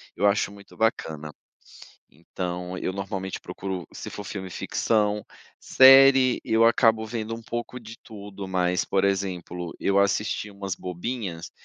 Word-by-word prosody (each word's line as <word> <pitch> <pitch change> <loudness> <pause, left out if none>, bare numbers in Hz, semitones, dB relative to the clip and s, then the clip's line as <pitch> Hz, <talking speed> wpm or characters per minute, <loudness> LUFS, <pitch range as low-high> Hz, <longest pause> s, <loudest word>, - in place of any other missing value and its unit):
eu 105 - 0
acho 100 0 +2
muito 100 0 -15
bacana. 80 -9 -1 0.8
Então 90 +3 -6
eu 95 - -3
normalmente 95 -1 -4
procuro, 95 -2 -6
se - - -7
for 105 - -7
filme, 95 -1 -6
ficção, 105 +2 0 0.4
série, 135 -1 +7
eu 115 +1 +3
acabo 115 -1 +3
vendo 115 0 -4
um 115 - -11
pouco 120 +2 -5
de 115 0 -11
tudo 100 -3 -9
mas, 90 -1 0
por 95 - 0
exemplo, 90 -3 -2
eu 100 0 +2
assisti 105 +1 0
umas 100 -1 -5
bobinhas, 90 -1 -5
100 Hz, 140 wpm, -25 LUFS, 90-110 Hz, 0.8 s, série